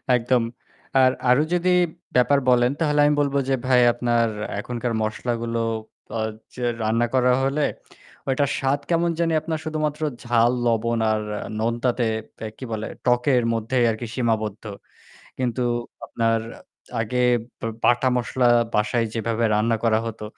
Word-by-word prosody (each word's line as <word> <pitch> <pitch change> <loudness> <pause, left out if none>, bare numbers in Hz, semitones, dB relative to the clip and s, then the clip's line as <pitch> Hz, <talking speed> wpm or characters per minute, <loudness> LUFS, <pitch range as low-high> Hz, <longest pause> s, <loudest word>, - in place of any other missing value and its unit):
একদম। 125 0 +2 0.6
আর 130 0 +5 0.2
আরো 130 +5 +5
যদি 180 +1 +1 0.5
ব্যাপার 140 +3 +4
বলেন 125 0 +4
তাহলে 150 -2 +1
আমি 150 - +4
বলব 140 -1 -1
যে 135 - +3
ভাই 125 -1 +5
আপনার 120 -1 +1 0.3
এখনকার 120 +1 -3
মসলাগুলো 115 +1 -2 0.6
আ - - -2 0.4
যে 125 - -5 0.2
রান্না 115 +2 +1
করা 125 -1 +4
হলে 140 +2 +1 0.6
ওইটার 135 +1 +1
স্বাদ 135 +1 +1
কেমন 170 0 +2
জানি 165 -1 +1
আপনার 160 -1 -3
শুধুমাত্র 155 -1 -2 0.2
ঝাল, 120 0 +3 0.2
লবণ 115 0 +1
আর 110 0 0 0.4
নোনতাতে 120 +1 0 0.5
কি - - -9
বলে 110 0 -3 0.2
টকের 125 0 +3
মধ্যেই 120 +2 +1
আরকি 110 +2 -5
সীমাবদ্ধ। 110 -4 -1 0.8
কিন্তু 125 0 -1 0.4
আপনার 115 -1 0 0.6
আগে 125 +3 0 0.4
বা 115 - -2 0.2
বাটা 120 +2 +4
মসলা 125 +1 0 0.3
বাসায় 110 +2 +1
যেভাবে 115 +1 -1
রান্না 115 +2 +2
করা 110 -1 +3
হতো, 110 -1 -6
120 Hz, 135 wpm, -23 LUFS, 115-130 Hz, 0.8 s, আর